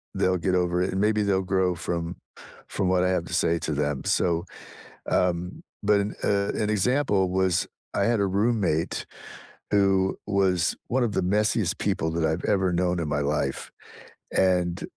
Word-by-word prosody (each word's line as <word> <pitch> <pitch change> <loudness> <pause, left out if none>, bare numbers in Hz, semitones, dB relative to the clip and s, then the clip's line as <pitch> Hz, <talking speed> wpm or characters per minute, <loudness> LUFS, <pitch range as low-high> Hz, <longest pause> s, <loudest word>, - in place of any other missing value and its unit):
they'll 95 0 +2
get 90 - +3
over 90 0 +1
it, 90 - 0
and, 95 - 0
maybe 105 0 +2
they'll 100 -2 +1
grow 95 -1 +1
from 85 +1 -3 0.5
from 95 - -1
what 90 -1 +2
I 90 - +2
have 90 -2 0
to 90 - -8
say 85 0 +2
to 80 - -3
them.” 75 -1 -1
So, 85 0 +1 0.6
um 90 0 0 0.2
but, 105 0 +3 0.2
uh, 100 0 +1
an 105 -1 -1
example 105 -2 +1
was 95 -2 +1 0.3
I - - +1
had 115 -2 +2
a 100 - +2
roommate 100 -5 0 0.7
who 95 -2 +2
was 95 -4 +1
one 130 +1 +1
of 110 -4 -1
the - - +1
messiest 105 +4 +1
people 80 - -1
that 80 0 0
I've 80 +2 -1
ever 95 -3 +1
known 90 0 0
in 80 - -2
my 75 0 -1
life, 70 -1 -2 0.6
and, 90 -2 +1
90 Hz, 170 wpm, -25 LUFS, 85-100 Hz, 0.7 s, get